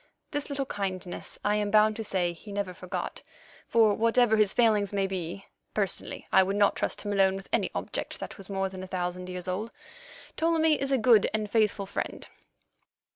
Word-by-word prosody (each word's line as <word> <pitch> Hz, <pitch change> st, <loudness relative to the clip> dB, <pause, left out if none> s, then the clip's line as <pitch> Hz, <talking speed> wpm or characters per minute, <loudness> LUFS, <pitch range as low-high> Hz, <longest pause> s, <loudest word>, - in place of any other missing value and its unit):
This 290 Hz, 0 st, -3 dB
little 280 Hz, -1 st, -2 dB
kindness 190 Hz, -5 st, -4 dB
I 210 Hz, 0 st, +3 dB
am 210 Hz, -1 st, 0 dB
bound 215 Hz, +1 st, +5 dB
to 225 Hz, -, -3 dB
say 180 Hz, -4 st, 0 dB
he 205 Hz, +5 st, -12 dB
never 200 Hz, -2 st, -3 dB
forgot, 180 Hz, 0 st, -5 dB, 0.5 s
for 220 Hz, -3 st, +4 dB
whatever 230 Hz, +1 st, +3 dB
his 215 Hz, -2 st, +4 dB
failings 215 Hz, -4 st, +3 dB
may 200 Hz, -1 st, +1 dB
be 190 Hz, 0 st, -4 dB, 0.3 s
(personally 200 Hz, -3 st, -2 dB
I 190 Hz, -, +8 dB
would 190 Hz, +1 st, 0 dB
not 205 Hz, 0 st, +3 dB
trust -, -, -2 dB
him 205 Hz, -1 st, -2 dB
alone 195 Hz, -1 st, +4 dB
with 195 Hz, 0 st, -8 dB
any -, -, +2 dB
object -, -, -4 dB
that -, -, -6 dB
was 195 Hz, -2 st, -8 dB
more 195 Hz, -1 st, 0 dB
than 190 Hz, -1 st, -8 dB
a 185 Hz, -, -7 dB
thousand 180 Hz, 0 st, -3 dB
years 180 Hz, 0 st, -5 dB
old), 195 Hz, +5 st, -2 dB, 0.7 s
Ptolemy 320 Hz, -2 st, +3 dB
is 275 Hz, 0 st, 0 dB
a 270 Hz, -, +4 dB
good 230 Hz, -3 st, +5 dB
and 210 Hz, -1 st, -2 dB
faithful 210 Hz, -3 st, +2 dB
friend. 195 Hz, -, -5 dB
205 Hz, 190 wpm, -28 LUFS, 190-220 Hz, 0.7 s, I